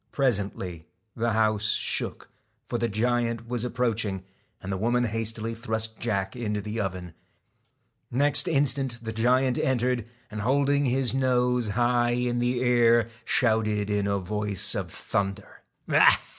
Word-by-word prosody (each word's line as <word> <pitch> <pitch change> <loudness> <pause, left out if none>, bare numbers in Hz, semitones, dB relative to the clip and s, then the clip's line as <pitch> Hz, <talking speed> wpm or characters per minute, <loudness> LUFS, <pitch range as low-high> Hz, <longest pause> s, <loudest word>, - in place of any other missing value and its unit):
Presently 100 - -1 0.3
the 115 0 0
house 110 -1 +2
shook, - - -2 0.4
for 120 - -3
the 120 - +1
giant 115 +1 -1
was 120 -1 -2
ap 125 - -4
proaching; 110 -6 -1 0.4
and 95 - -6
the 95 - -1
woman 120 +4 +1
hastily 115 0 -2
thrust 110 -1 -2
Jack 100 -4 -2
into 105 -4 -2
the 105 +2 -4
oven. 90 -3 -5 1.0
Next 145 +4 +2
instant 135 -4 +1
the 110 - -4
giant 125 +3 +2
entered, 125 -2 0 0.3
and 110 0 -4
holding 140 +4 +2
his 130 -1 +1
nose 125 -2 +1
high 120 0 +2
in 120 -1 0
the 125 +1 0
air, 120 -2 +4 0.2
shouted 110 -3 +1
in 100 -1 0
a 100 0 +1
voice 105 0 -1
of - - -4
thunder: 100 -1 -4 0.2
1 - - +2
Ha! - - +6
115 Hz, 145 wpm, -26 LUFS, 105-125 Hz, 1.0 s, Ha